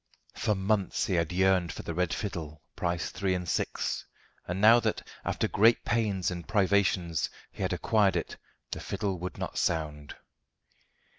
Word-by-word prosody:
For 105 -2 0
months 100 0 0
he 95 - -1
had 85 -2 +1
yearned 95 -2 +3
for - - -7
the 85 - -4
red 90 -1 0
fiddle, 80 -7 -4
price 85 -1 -1
three 95 0 0
and 90 -1 -4
six, - - -1 0.4
and 90 +2 -2
now 110 +3 +8
that, 110 -2 -2 0.2
after - - 0
great 115 +3 +4
pains 105 -6 +1
and 85 -2 -6
privations, 95 -5 +2 0.2
he - - -9
had - - 0
acquired 100 -4 +2
it, 85 - -3 0.3
the - - -3
fiddle 100 -2 -3
would 90 +1 -5
not - - -3
sound. 75 -3 -2
95 Hz, 160 wpm, -29 LUFS, 85-100 Hz, 0.4 s, now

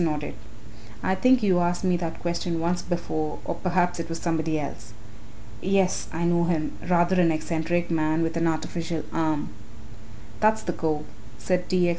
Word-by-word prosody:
nodded. 150 -2 -1 0.7
"I 190 - +2
think 255 +5 +4
you 185 -3 +4
asked 175 +1 0
me 180 -1 +3
that 165 -2 -4
question 170 -1 -1
once 175 +2 0
before, 155 -3 -2
or - - -1
perhaps 180 -1 0
it 165 - -4
was 165 - -3
somebody 160 -2 0
else. 115 -6 -6 0.7
Yes, 190 -1 +2
I 165 +1 -1
know 170 0 +3
him, 165 -3 -1
rather 180 +1 +4
an 165 -2 +4
eccentric 165 +2 -1
man 155 0 +2
with 165 0 -1
an 165 0 +2
artificial 165 0 -2
arm." 155 -2 0 0.9
"That's 220 0 +3
the 175 - -2
cove," 155 -2 -1 0.3
said 180 +7 -1
T. 180 -2 +3
X. - - +3
170 Hz, 170 wpm, -26 LUFS, 160-180 Hz, 0.9 s, think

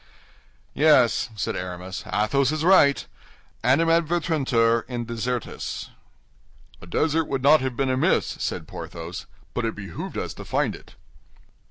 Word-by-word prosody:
"Yes," 135 -5 +4
said 100 - -2
Aramis, 90 +1 -5
"Athos 130 +6 +2
is 155 0 -2
right: 165 -6 +5 0.6
Animadvertuntur 150 -5 +2
in 120 -2 -4
desertis." 120 +1 -4 0.9
"A 90 - -12
desert 160 - +1
would 135 -2 -3
not 150 +1 +6
have 130 -2 -2
been 135 -1 +1
amiss," 130 +1 +1
said - - -3
Porthos; 85 +1 -7 0.3
"but 120 - -2
it 115 - -2
behooved 95 -5 -7
us - - -3
to - - -9
find - - 0
it." - - -14
130 Hz, 130 wpm, -24 LUFS, 115-150 Hz, 0.9 s, not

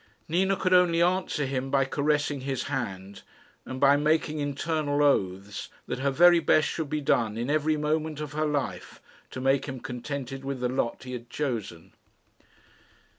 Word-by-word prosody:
Nina 190 +4 +2
could 185 0 0
only 180 -2 +5
answer 175 -4 +1
him 135 0 -2
by 135 0 +2
caressing 145 0 0
his 135 0 -2
hand, 100 -8 -5 0.5
and 130 - -5
by 140 +1 +5
making 155 +1 +1
internal 145 0 -1
oaths 100 -7 0 0.2
that - - -4
her 140 +1 +1
very 175 +5 +6
best 155 -1 +3
should 160 -3 -3
be 150 0 -1
done 115 -5 +1
in 120 +4 -2
every 155 0 +1
moment 155 0 -1
of 150 -2 -5
her 155 +1 0
life 145 -2 -3 0.3
to - - -7
make 135 +2 +1
him 130 -2 -5
contented 135 +2 -5
with 135 -1 -4
the 125 0 0
lot 125 -1 -2
he 125 -1 -7
had 120 -1 -7
chosen. 115 - -4
140 Hz, 170 wpm, -27 LUFS, 130-155 Hz, 0.5 s, very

